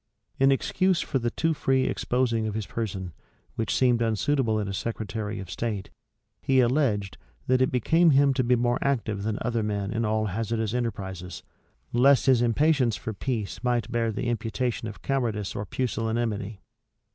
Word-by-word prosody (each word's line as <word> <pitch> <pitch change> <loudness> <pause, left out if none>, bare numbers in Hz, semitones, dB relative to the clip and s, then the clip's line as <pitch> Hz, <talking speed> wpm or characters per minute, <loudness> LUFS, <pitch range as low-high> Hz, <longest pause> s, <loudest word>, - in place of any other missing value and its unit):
In 135 +1 +5
excuse 185 +6 +1
for 135 - -1
the 120 -1 0
too 165 +6 0
free 135 -3 +1
exposing 120 -3 0
of 105 - -3
his 110 -2 -2
person, 95 -6 -4 0.4
which 115 -2 -2
seemed 125 -2 +3
unsuitable 115 +1 +1
in 105 - -2
a 100 - -3
secretary 110 0 -4
of 95 -2 -8
state, 105 -2 -3 0.5
he 130 -1 +3
alleged, 120 -6 +1 0.3
that 130 0 +2
it 130 - +3
became 165 +8 +3
him 140 -1 +5
to 130 -1 +1
be 125 +1 +3
more 120 +1 +1
active 115 -7 -1
than 105 +1 -2
other 120 -2 0
men 105 -1 -2
in 115 +1 -1
all 110 0 +1
hazardous 110 +2 -2
enterprises, 95 -7 -4 0.5
lest 135 +3 +5
his 130 -3 +5
impatience 125 0 +2
for 110 - -5
peace 110 -1 -4
might 120 -1 0
bear 115 -1 0
the 110 - -4
imputation 120 0 -2
of 105 - -9
cowardice 115 -7 -1
or 100 - -4
pusillanimity. 110 -3 -2
115 Hz, 170 wpm, -26 LUFS, 105-130 Hz, 0.5 s, In